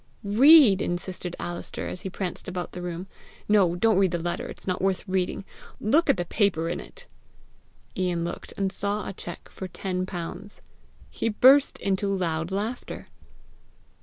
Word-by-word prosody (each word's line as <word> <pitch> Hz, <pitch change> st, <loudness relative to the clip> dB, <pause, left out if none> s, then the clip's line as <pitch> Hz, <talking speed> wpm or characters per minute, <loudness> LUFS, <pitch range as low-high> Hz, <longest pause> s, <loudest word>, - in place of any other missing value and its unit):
"READA," 230 Hz, 0 st, +7 dB
insisted 175 Hz, 0 st, -4 dB
Alister, 175 Hz, 0 st, -5 dB
as 180 Hz, -, -6 dB
he 190 Hz, -, -4 dB
pranced 185 Hz, -1 st, -5 dB
about 180 Hz, -1 st, -4 dB
the 180 Hz, -, -7 dB
room. 175 Hz, 0 st, -5 dB, 0.4 s
"No, 195 Hz, -5 st, +4 dB
don't 215 Hz, +1 st, +3 dB
read 195 Hz, -1 st, +4 dB
the 175 Hz, -, -1 dB
letter; 175 Hz, +1 st, -3 dB
it's -, -, -10 dB
not 185 Hz, -1 st, -2 dB
worth, 190 Hz, +1 st, 0 dB
reading. 185 Hz, +1 st, -1 dB, 0.3 s
Look 300 Hz, +9 st, +2 dB
at 275 Hz, -, +4 dB
the 175 Hz, -, -2 dB
paper 170 Hz, -4 st, +1 dB
in -, -, -2 dB
it." -, -, -12 dB, 0.9 s
Ian 175 Hz, -2 st, -1 dB
looked, 175 Hz, -, -6 dB
and 195 Hz, -1 st, 0 dB
saw 205 Hz, +2 st, -2 dB
a -, -, -5 dB
cheque 175 Hz, -2 st, -8 dB
for 190 Hz, -, -7 dB
ten 185 Hz, 0 st, -3 dB
pounds. 180 Hz, +3 st, -7 dB, 0.5 s
He 230 Hz, -, -1 dB
burst 265 Hz, +6 st, +5 dB
into 195 Hz, 0 st, -1 dB
loud 165 Hz, -3 st, -1 dB
laughter. 215 Hz, +6 st, -4 dB
190 Hz, 165 wpm, -26 LUFS, 175-205 Hz, 0.9 s, READA